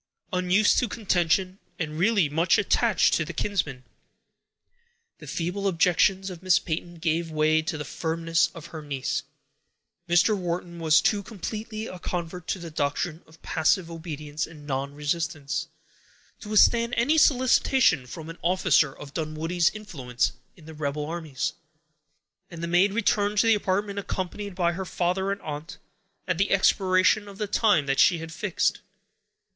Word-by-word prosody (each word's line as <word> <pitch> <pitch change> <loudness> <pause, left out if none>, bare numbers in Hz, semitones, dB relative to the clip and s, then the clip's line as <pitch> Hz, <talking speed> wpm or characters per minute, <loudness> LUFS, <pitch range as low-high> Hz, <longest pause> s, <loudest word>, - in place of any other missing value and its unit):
Unused 185 +3 +3
to 245 - 0
contention, 185 -2 0 0.2
and 155 -3 -4
really 200 -3 +3
much 160 +5 +2
attached - - +2
to - - +2
her - - -7
kinsman, 150 -11 -2 1.4
the - - -11
feeble 180 +4 -2
objections 190 +2 +2
of 175 -2 -9
Miss 185 -1 +4
Peyton 175 +1 -4
gave 165 0 -1
way 155 0 +2
to 160 0 -4
the 150 - -5
firmness 165 +2 0
of 165 -1 -9
her 160 - -6
niece. 140 -3 -2 0.9
Mr. 175 +5 +4
Wharton 175 -2 -4
was 155 -1 +4
too 205 -2 +1
completely 215 +2 -6
a 185 - -8
convert 175 -1 -5
to - - -1
the 170 -2 -8
doctrine 155 +3 -2
of 160 +1 -20
passive 170 +2 +1
obedience 155 -2 -5
and 150 -3 -13
nonresistance, 145 +2 -2 0.7
to 210 - -10
withstand 235 +3 +4
any 290 +7 +3
solicitation 255 - +3
from 160 +5 -8
an 165 +1 -9
officer 170 -4 +3
of 140 +1 -12
Dunwoodie's 160 +2 0
influence 140 - -2 0.2
in 165 - -17
the 160 - -10
rebel 150 -1 -3
armies; 160 -4 -3 1.0
and 170 -1 -8
the - - -1
maid 180 +4 +3
returned 205 -1 +1
to 205 - +4
the 225 - +5
apartment, 200 0 -1
accompanied 195 +1 -4
by 175 -2 +1
her 185 +3 -4
father 185 +2 -1
and 200 - -3
aunt, 155 +4 -7 0.5
at 180 -2 -1
the 195 - +2
expiration 190 +1 +3
of 200 -1 -11
the 210 - -2
time 205 -6 +2
that 135 0 0
she 175 - +5
had 165 0 -8
fixed. 190 +3 0
175 Hz, 155 wpm, -26 LUFS, 155-195 Hz, 1.4 s, the